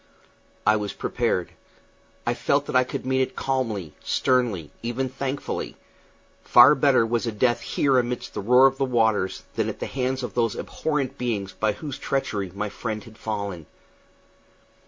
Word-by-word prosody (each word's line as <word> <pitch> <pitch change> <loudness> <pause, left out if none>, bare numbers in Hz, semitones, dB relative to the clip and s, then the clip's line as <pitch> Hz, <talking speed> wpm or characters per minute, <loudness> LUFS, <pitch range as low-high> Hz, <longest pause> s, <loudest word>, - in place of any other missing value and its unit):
I 110 0 +5
was 105 -1 -3
prepared. 115 -7 -1 0.7
I 120 - +1
felt 140 +3 +1
that - - -5
I 130 - +6
could 125 - -5
meet 130 0 +2
it 130 - -2
calmly, 115 - -2
sternly, 120 - +1
even 120 +3 -2
thankfully; 135 +2 -4 0.7
far - - +8
better 115 - +4
was 115 +1 -1
a - - 0
death 120 +3 +1
here 135 -3 +2
amid 125 0 -1
the - - -6
roar 125 +6 +6
of 135 0 +3
waters 110 -7 +1
than - - 0
at - - -6
the - - -3
hands 130 0 -2
of 125 - -4
those 115 -3 +1
abhorrent 140 -4 -2
beings 105 -6 -2
by 110 +1 0
whose 140 +5 -7
treachery 100 -8 -2
my 105 +1 -2
friend 110 +1 -5
had 110 -1 -15
fallen. 100 -7 -4
120 Hz, 160 wpm, -25 LUFS, 105-130 Hz, 0.7 s, far